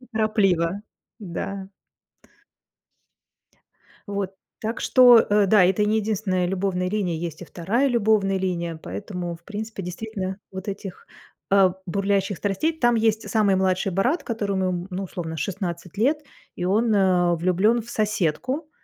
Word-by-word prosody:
неторопливо, 205 -6 0 0.4
да. 195 0 -5 2.4
Вот. 200 -2 -2 0.3
Так 225 +2 -3
что, 250 -2 +7
э, 210 -2 +3
да, 195 -1 +6
это 190 +3 +2
и - - +2
не 215 +1 +2
единственная 200 -4 0
любовная 180 0 -1
линия. 190 -3 -1
Есть 165 0 -5
и - - -6
2 205 - 0
любовная 215 -5 +2
линия, 170 -3 -2
поэтому, 180 -4 -5
в 170 - -27
принципе, 215 0 -6
действительно 190 +1 -5
вот 190 +2 -7
этих, 195 -2 -7 0.4
э, 195 -2 +5
бурлящих 195 0 0
страстей 205 - 0
Там 240 -7 +2
есть 220 -1 +1
самый 210 -4 +3
младший 190 0 +1
брат, 245 - +1
которому, 190 -5 -2
ну, 190 +2 -3
условно, 165 -3 -5
16 175 +1 -4
лет, 295 +7 +2 0.3
и 175 - -4
он, 215 +4 +2
э, 180 -3 +3
влюблен 190 +7 +2
в 235 - -12
соседку, 215 - -1
195 Hz, 135 wpm, -24 LUFS, 180-220 Hz, 2.4 s, что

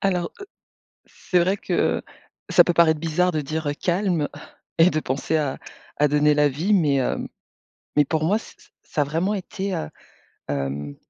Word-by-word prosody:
Alors, 180 -3 0
heu, 400 - -8 0.6
c'est 180 - -1
vrai 185 +4 +2
que - - 0 0.5
ça - - +7
peut 175 - 0
paraître 160 -2 +4
bizarre 170 +3 +1
de 155 -3 -1
dire: 155 +1 -2
«Calme» 175 -4 +1 0.5
et 165 +2 +6
de 155 - 0
penser 140 +3 -1
à 145 -3 -1 0.4
à 150 - +4
donner 150 +1 +3
la 150 0 +3
vie 165 +10 0
mais 150 -8 +3
heu 125 - -1 0.8
mais 150 - +6
pour 155 +2 -1
moi 200 +7 +2
ç - - -14
ç - - -23
ça 150 - -1
a - - +2
vraiment 165 +8 -1
été, 195 0 -4
heu, 75 - -4 0.6
hem, 70 0 -3
160 Hz, 180 wpm, -23 LUFS, 145-180 Hz, 0.8 s, ça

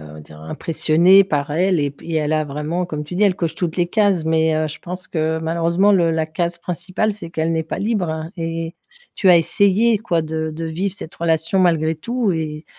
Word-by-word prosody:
on 75 0 -11
va 75 - -10
dire, 75 0 -14
impressionné 165 - +3
par 145 -6 -2
elle 180 +3 +2
et 145 -2 -1
puis 160 +3 -5
elle 155 0 0
a 155 0 +2
vraiment, 150 +5 -3
comme 150 -3 -5
tu 150 - -8
dis, 190 - 0
elle 195 -3 +3
coche 165 -4 -2
toutes 170 -2 -3
les 175 -1 +2
cases. 195 -4 +1
Mais, 160 0 +2
heu, 155 0 0
je 155 - -8
pense 180 +1 -6
que 160 -1 -1
malheureusement, 170 +5 +2
le 175 -4 +3
la 160 -1 0
case 170 +2 -2
principale, 180 +5 -2
c'est 185 -5 -8
qu'elle 160 0 -1
n'est 160 -1 0
pas 160 - -5
libre, 210 -4 -1
hein. 160 +1 -5
Et 165 0 -4 0.4
tu 195 - +1
as 180 - +8
essayé, 200 +6 +3
quoi, 175 -6 -1
de 160 0 -3
de 165 +2 -5
vivre 175 +5 -2
cette 165 -5 -8
relation 165 +2 +1
malgré 160 -3 +2
tout 230 +5 -1
et 155 -1 -4
165 Hz, 225 wpm, -20 LUFS, 155-185 Hz, 0.4 s, as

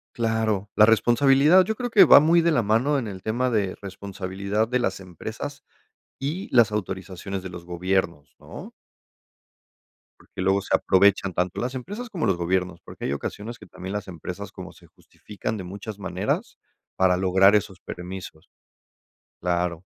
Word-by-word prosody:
Claro. 110 -3 0
La 105 - +6
responsabilidad, 135 - +5
yo 220 +3 -3
creo 245 +1 -3
que 200 -4 +8
va 155 - +9
muy 165 +3 +4
de 170 - +2
la 125 -7 +2
mano 115 +8 +2
en 120 - -3
el 95 -3 -7
tema 120 +4 0
de 105 -6 -1
responsabilidad 100 +1 -3
de 125 +2 0
las 95 -5 -1
empresas 90 -4 -8 0.6
y 155 +8 -4
las 115 -3 +6
autorizaciones 95 -1 -5
de 95 - -6
los 85 -1 -10
gobiernos, 90 -3 -2
¿no? - - -10 1.5
Porque 95 - -8
luego 95 +1 +2
se - - +1
aprovechan 95 0 +3
tanto 90 +5 -2
las 125 +2 -3
empresas 205 - -6
como 175 - -2
los 95 -4 +2
gobiernos, 90 0 -1
porque - - -7
hay 70 - -1
ocasiones 110 +10 -6
que - - -13
también 95 +2 -8
las 105 - -4
empresas 95 +3 -7
como - - -9
se - - -19
justifican 105 +1 -7
de 95 - -6
muchas 100 +3 -8
maneras 95 +1 -3 0.4
para 95 -1 +3
lograr 95 +2 +4
esos 95 -2 -3
permisos. 90 +2 -9 0.9
Claro. 90 -1 -1
100 Hz, 160 wpm, -24 LUFS, 95-120 Hz, 1.5 s, va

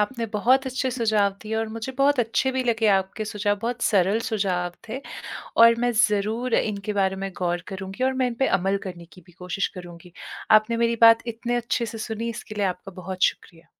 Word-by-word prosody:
आपने 230 +2 -1
बहुत 260 +6 +3
अच्छे 260 0 -1
सुझाव 215 -5 +1
दिए 215 +1 -4
और 225 0 -1
मुझे 225 +4 -6
बहुत 280 0 +3
अच्छे 235 +3 +1
भी 260 0 0
लगे 230 -2 +1
आपके 190 +3 -3
सुझाव, 205 -1 -1
बहुत 240 +1 -3
सरल 200 +1 +3
सुझाव 185 -5 -1 0.2
थे। 245 +5 -4 0.6
और 230 0 +8
मैं 245 - +3
ज़रूर 220 +2 +1
इनके 210 0 -1
बारे 195 -1 +1
में 195 0 -4
गौर 175 -1 -1
करूँगी 190 +4 -4
और 265 - +2
मैं - - +3
इन 245 - -3
पे 265 - +4
अमल 195 +2 0
करने 175 -3 -7
की 180 - -15
भी 175 - -18
कोशिश 180 +2 -3
करूँगी। 175 0 -11 0.5
आपने 230 +2 -4
मेरी 235 0 +1
बात 230 0 +8
इतने 235 +1 -2
अच्छे 240 0 -1
से 225 +1 -7
सुनी, 220 +1 -4
इसके 220 -2 -8
लिए 205 -1 -1
आपका 195 +1 -13
बहुत 185 +1 -6
शुक्रिया। 165 -1 -3
215 Hz, 205 wpm, -24 LUFS, 195-235 Hz, 0.6 s, और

